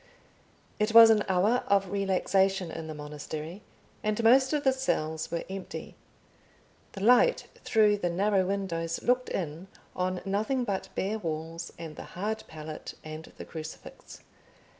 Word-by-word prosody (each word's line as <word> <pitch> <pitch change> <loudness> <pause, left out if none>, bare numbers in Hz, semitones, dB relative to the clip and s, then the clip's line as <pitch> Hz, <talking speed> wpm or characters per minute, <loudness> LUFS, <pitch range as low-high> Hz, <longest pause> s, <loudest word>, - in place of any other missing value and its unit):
It 215 +1 0
was 230 -1 +11
an 210 -2 +3
hour 200 +7 +2
of 195 -2 +2
relaxation 195 -2 +1
in 160 0 -6
the 155 - -6
monastery, 150 +4 -7 0.4
and 215 +1 -1
most 260 +3 +6
of 300 -2 0
the 265 -2 +4
cells 160 -12 -1
were 170 - -2
empty. 190 0 -7 1.0
The 195 - -6
light 250 - +5 0.2
through 210 -2 +4
the 180 -3 -1
narrow 195 +2 +2
windows 170 -4 -2
looked 250 +1 +2
in 165 +1 -4 0.3
on 185 0 -1
nothing 215 +7 0
but 200 -5 -3
bare 210 +3 -1
walls, 165 -1 -5
and 160 -2 -8
the - - -6
hard 215 +4 -2
pallet 155 0 -8
and 155 +1 -8
the - - -8
crucifix. 160 -1 -9
195 Hz, 145 wpm, -29 LUFS, 165-215 Hz, 1.0 s, was